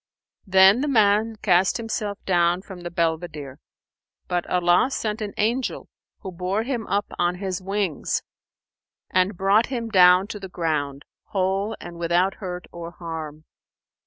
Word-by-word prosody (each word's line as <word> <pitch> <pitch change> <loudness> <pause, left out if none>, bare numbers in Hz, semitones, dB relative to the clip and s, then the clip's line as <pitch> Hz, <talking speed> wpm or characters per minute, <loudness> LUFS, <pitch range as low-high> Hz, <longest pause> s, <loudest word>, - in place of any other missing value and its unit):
'" - - -69
Then 190 +5 +6
the 295 - 0
man 220 -3 +3
cast 185 -1 +3
himself 220 -3 -3
down 175 0 +2
from 190 -3 -10
the 175 - -5
belvedere; 160 -5 -3 0.7
but 175 -1 -1
Allah 175 +6 +3
sent 220 -4 -3
an 205 -1 -5
angel 235 +5 -1 0.3
who 190 - -6
bore 185 +4 -2
him 240 -4 -3
up 205 +1 0
on 175 0 +1
his 190 0 -4
wings 195 -4 -2 0.9
and 185 +1 +1
brought 200 +4 +3
him 235 -3 -4
down 180 -1 +6
to 210 - -6
the 190 -1 -8
ground, 150 -5 -2 0.2
whole 195 +2 -1
and 170 -1 -9
without 175 +3 +2
hurt 180 -2 -5
or 170 -1 -7
harm. 155 -3 -7
185 Hz, 150 wpm, -24 LUFS, 175-210 Hz, 0.9 s, Then